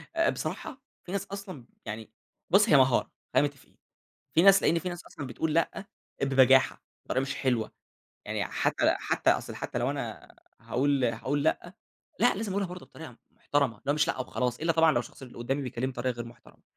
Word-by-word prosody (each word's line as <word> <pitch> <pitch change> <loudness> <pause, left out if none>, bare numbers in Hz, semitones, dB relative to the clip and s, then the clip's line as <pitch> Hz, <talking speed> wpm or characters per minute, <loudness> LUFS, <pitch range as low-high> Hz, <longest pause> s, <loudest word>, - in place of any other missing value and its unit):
آآ، 330 0 +3
بصراحة، 275 -2 -5 0.2
في 180 - -8
ناس 200 0 -2
أصلًا 195 - -8 0.2
يعني 110 0 -6 0.4
بُص، 205 +4 +5
هي 150 - +7
مهارة، 130 -2 +3 0.2
خلينا 145 - +4
متفقين. 140 -2 -16 0.6
في 165 - +6
ناس 195 +1 +7
لأن 170 - +3
في 180 +1 -4
ناس 175 -1 -7
أصلًا 145 - -8
بتقول 150 +6 -2
لأ، 165 +4 0 0.4
ببجاحة، 135 -1 +4 0.3
طريقة 130 - +1
مش 135 +1 -3
حلوة. 120 -5 0 0.6
يعني - - -1
حتى - - +1
حتى - - +1
أصلًا - - -1
حتى - - -4
لو - - 0
أنا - - -6 0.3
هاقول 130 +4 +1
هاقول 130 +5 -1
لأ، 175 +3 0 0.4
لأ 245 - +4
لازم 205 0 -3
أقولها 200 0 0
برضه 180 0 -9
بطريقة 150 -7 -11
محترمة 140 -5 0
اللي 140 - -3
هو - - +3
مش 150 0 +2
لأ - - -1
وخلاص، 125 -1 -2
إلا 165 +1 +2
طبعًا 160 0 +5
لو 120 - +2
الشخص 120 - -12
اللي 125 -3 -11
قدامي 135 +4 -1
بيكلمني 130 0 -3
بطريقة 125 0 -2
غير 120 0 -5
محترمة. 120 0 -16
140 Hz, 195 wpm, -28 LUFS, 125-175 Hz, 0.6 s, هي